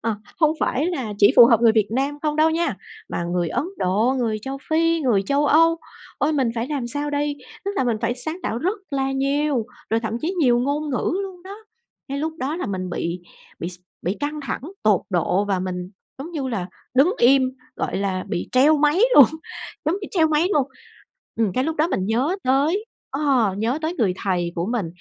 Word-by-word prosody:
Ờ, 225 -1 -1 0.2
hông 310 -2 +5
phải 285 +6 +1
là 265 -12 -2
chỉ 205 +4 +6
phù 240 - +10
hợp 230 -3 +4
người 230 -2 +6
Việt 215 -2 +2
Nam 275 +5 -1
không 300 -1 0
đâu 310 +1 +4
nha, 330 - 0 0.3
mà 170 - -3
người 175 0 -1
Ấn 240 - -1
Độ, 210 +8 +2
người 225 -3 0
Châu 270 +2 -5
Phi, 330 +1 +2
người 235 -9 +2
Châu 280 +8 +1
Âu. 330 +3 +5 0.4
Ôi! 300 - +1
Mình 270 -5 +1
phải 230 0 -2
làm 280 -5 -2
sao 290 +5 -2
đây? 290 0 -1 0.3
Tức 400 - -1
là - - +1
mình 235 -3 +1
phải 235 +1 0
sáng 315 +6 -4
tạo 230 - -2
rất 375 - -1
là 270 -1 -1
nhiều, 275 -2 0 0.2
rồi 225 +1 +2
thậm 225 0 -3
chí 355 +5 -2
nhiều 245 -5 +4
ngôn 290 +4 -1
ngữ 255 - 0
luôn 370 -2 -8
đó. 390 +2 -9 0.5
Cái 275 +1 -3
lúc 315 +2 -2
đó 290 +4 -2
là - - -3
mình 185 -2 -3
bị 175 +1 -3 0.4
bị 170 - -3
s 180 0 -9 0.2
bị 185 +4 -1
căng 300 +1 -3
thẳng 275 - -4 0.2
tột 210 -4 +4
độ, 180 +2 +1
và 195 -2 0
mình, 180 -1 -4 0.3
giống 290 +6 -7
như 280 -5 -3
là, 205 -8 -2 0.3
đứng 280 +8 +5
im, 265 +2 +5 0.3
gọi - - -2
là, 190 -1 -1
bị - - -3
treo 285 +5 +5
máy 300 +5 +3
luôn, 285 - +11 0.6
giống 315 +5 +1
bị 395 - -6
treo 330 -4 +3
máy 310 +3 +2
luôn. 280 -5 +2 0.7
Ừm, 220 -4 +1
cái 255 +7 0
lúc 320 +1 -2
đó 310 - +3
mình 190 - -1
nhớ 255 - +1
tới, 295 +11 +2 0.3
ờ, 265 -8 +2
nhớ 235 +7 0
tới 320 +2 -1
người 210 -7 +2
thầy 175 -3 0
của 170 +1 -2
mình, 230 -4 -1
265 Hz, 220 wpm, -22 LUFS, 215-300 Hz, 0.7 s, luôn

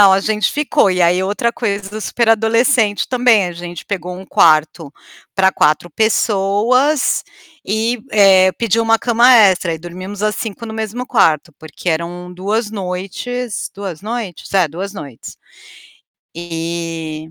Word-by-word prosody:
Não, 200 -1 +7
a 190 - +3
gente 215 +1 0
ficou. 295 -8 +2
E 180 -1 +1
aí, 175 +2 +3
outra 220 +4 -1
coisa 200 -4 -3
do 215 +1 -6
super 235 +2 -1
adolescente 225 0 +2
também, 245 -6 +3
a 175 - -7
gente 175 0 -8
pegou 180 -2 -5
um 190 - -10
quarto 155 -2 +2 0.4
para 190 -1 +3
4 155 0 +1
pessoas, 220 - +1 0.4
e, 225 +3 -1
eh, 190 -3 +5
pediu 230 -1 0
uma 225 0 +3
cama 235 +2 +3
extra. 190 -7 +4
Aí, 160 - -5
dormimos 185 +4 -8
as 210 -1 0
5 225 0 -6
no 220 - -7
mesmo 220 +3 -4
quarto 165 - +2
porque 160 +3 -7
eram 175 +2 -3
2 205 +4 -2
noites 200 +5 -5
2 195 -5 -7
noites? 215 -7 -6
É, 185 -4 +3
2 190 +6 -6
noites. 140 - -10 1.0
E 165 -2 -5
195 Hz, 150 wpm, -17 LUFS, 175-225 Hz, 1.0 s, Não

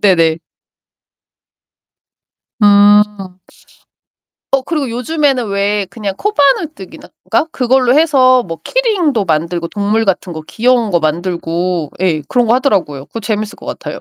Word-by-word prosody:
네네. 165 -5 +3 2.2
음. 205 0 +6 1.5
어 270 - +2
그리고 285 -2 -3
요즘에는 255 0 -1
왜 200 0 0
그냥 205 -4 -5
코바늘 310 - +1
뜨기나 - - -12 0.2
가 - - +2
그걸로 255 0 +2
해서 255 -5 +4
뭐 165 -4 -7
키링도 365 - 0
만들고 170 +1 -1
동물 210 +3 -1
같은 190 -2 -1
거 160 - -6
귀여운 235 -2 +1
거 175 - +2
만들고 170 0 -2
예 170 -5 0
그런 245 -1 +2
거 225 - +3
하더라고요. 190 - 0
그거 230 - -7
재밌을 215 -1 -3
것 - - -13
같아요. - - -6
210 Hz, 270 characters per minute, -14 LUFS, 180-255 Hz, 2.2 s, 음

